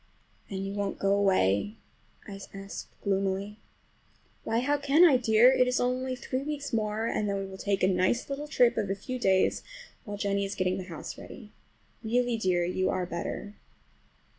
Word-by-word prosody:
"And 195 -1 -4
you 195 - -4
won't 200 -1 -2
go 195 0 +2
away?" 195 - +2 0.5
I 195 -1 -8 0.2
asked 195 0 -7 0.2
gloomily. 195 +1 -1 0.8
"Why, 225 +1 0
how 285 +3 +1
can 285 +5 +5
I, 285 -7 +6
dear? 235 +1 +5
It 255 -1 +3
is 250 - +1
only 255 +1 -1
three 255 +1 -3
weeks 285 -1 -5
more 215 0 0
and 210 -2 -1
then 200 - -1
we 195 - -3
will 190 0 -10
take 200 -2 -1
a - - +6
nice 185 +5 +1
little 285 +2 -4
trip 245 -5 +3
of 205 -3 -1
a 195 - 0
few 255 +6 -6
days 190 -4 +2 0.4
while 205 -3 -6
Jennie 200 -1 0
is 195 0 -4
getting 185 0 0
the 185 - -6
house 170 -4 -8
ready. 210 -5 -11 0.5
Really, 245 +2 +1
dear, 185 -5 +1
you 185 +1 0
are 185 - -1
better!" 175 +4 -5
205 Hz, 185 wpm, -28 LUFS, 195-245 Hz, 0.8 s, I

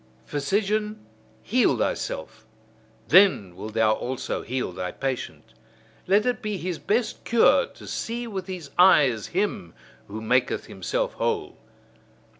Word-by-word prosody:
Physician, 210 - -1 0.4
heal 230 - +2
thyself: 110 -1 -3 0.7
then 170 - +5
wilt 110 +3 -8
thou 110 -1 +4
also 125 +3 -3
heal 125 -5 -3
thy 90 0 -4
patient. 135 -2 -5 0.5
Let 200 +3 +4
it 245 -3 0
be 210 -2 -3
his 180 -2 -4
best 225 +3 -1
cure 235 - +4
to - - -15
see 235 +1 -4
with 195 -5 -5
his 175 -7 -7
eyes 140 - +5
him 185 - -2 0.3
who 105 +2 -6
maketh 125 +3 +1
himself - - -2
whole. 410 -5 -2
185 Hz, 125 wpm, -25 LUFS, -, 0.7 s, then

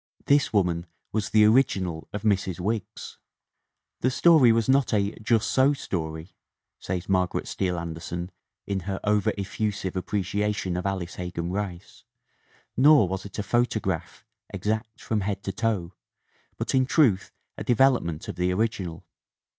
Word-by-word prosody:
This 145 -1 +3
woman 90 -4 +1 0.2
was 110 -1 -1
the 105 -1 +5
original 95 -8 +2
of 105 0 -5
Mrs. 95 -4 0
Wiggs. 105 +1 -4 0.8
"The 130 - +2
story 140 -2 +6
was 115 -1 +1
not 135 -3 +3
a 100 0 +1
'just 110 0 +2
so 135 +2 +3
story,' 80 - -5 0.3
" - - -61
says 90 -1 -4
Margaret 90 -2 0
Steele 90 -2 -1
Anderson 85 +2 -5 0.3
in 100 -1 -2
her 95 - -2
over 105 -1 +2
effusive 100 -1 -3
appre 95 +2 -2
ciation 100 -1 -1
of 90 +2 -2
Alice 95 -2 -4
Hegan 90 -1 -4
Rice, 95 -3 -5 0.7
"nor 140 -4 +6
was 95 +2 -4
it 100 - -9
a 105 - -1
photo 120 +2 +1
graph, 95 +1 -4 0.3
exact 110 +3 -3
from 110 -2 -1
head 100 0 -3
to 95 - -2
toe, 95 -4 -2 0.6
but, - - -2
in 130 -1 +3
truth, 120 - +3 0.2
a - - -6
devel 130 +2 +4
opment 80 -2 -5
of - - -6
the 90 +1 +1
original. 95 -4 -2
100 Hz, 155 wpm, -26 LUFS, 90-110 Hz, 0.8 s, story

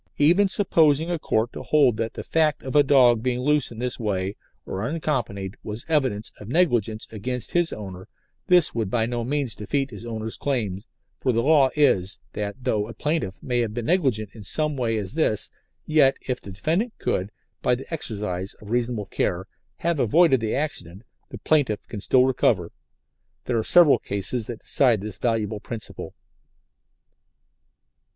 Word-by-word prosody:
Even 175 +7 +4
supposing 165 -5 +3
a 170 - -1
Court 115 -4 0
to - - -7
hold 140 -7 +3
that 115 0 -3
the - - -5
fact 155 -2 +1
of 130 +2 -5
a 145 - +8
dog 130 -5 +5
being 125 0 -1
loose 150 +1 +1
in 115 - -10
this 125 +1 -3
way 100 -3 -2 0.3
or 95 - -4
unaccompanied 120 - -2
was 110 +2 -6
evidence 130 -10 0
of 105 - -10
negligence 120 - +1
against 120 +3 -4
his 175 -1 +1
owner 95 -3 -8 0.4
this 180 -3 +5
would 110 -4 -2
by 110 +1 +1
no 120 0 -2
means 135 -2 0
defeat 135 +7 -2
his - - -9
owner's 110 -1 -4
claim, 110 -9 -2 0.4
for 130 - +1
the 115 0 +1
law 145 -3 +5
is, 100 -11 +2 0.2
that 105 -1 -3
though 105 -3 0
a 115 - -9
plaintiff 150 - -2
may 125 -1 0
have 115 -2 -1
been 120 -2 -3
negligent 130 - +1
in 110 - -11
some 150 - +1
such 140 - -6
way 115 -2 0
as 100 +1 -4
this, 110 -9 +1 0.3
yet 150 -4 +4
if 125 - -2
the - - -10
defendant 165 - -1
could, 95 +2 -1 0.3
by 125 - +2
the 130 - -8
exercise 100 - -4
of 105 0 -12
reasonable 120 -3 -1
care, 95 -1 -2 0.3
have 170 -2 -1
avoided 135 +3 +4
the 110 -1 -2
accident, 105 - -3 0.3
the - - -8
plaintiff 140 -9 +1
can 105 - -7
still 130 +4 +4
recover. 110 -9 +1 0.7
There 120 -2 0
are - - -1
several 170 0 +6
cases 100 +4 -2
that 120 -3 -7
decide 120 -7 +2
this 105 -1 -7
valuable 110 -3 -1
principle. 110 0 -7
120 Hz, 175 wpm, -24 LUFS, 105-145 Hz, 0.7 s, a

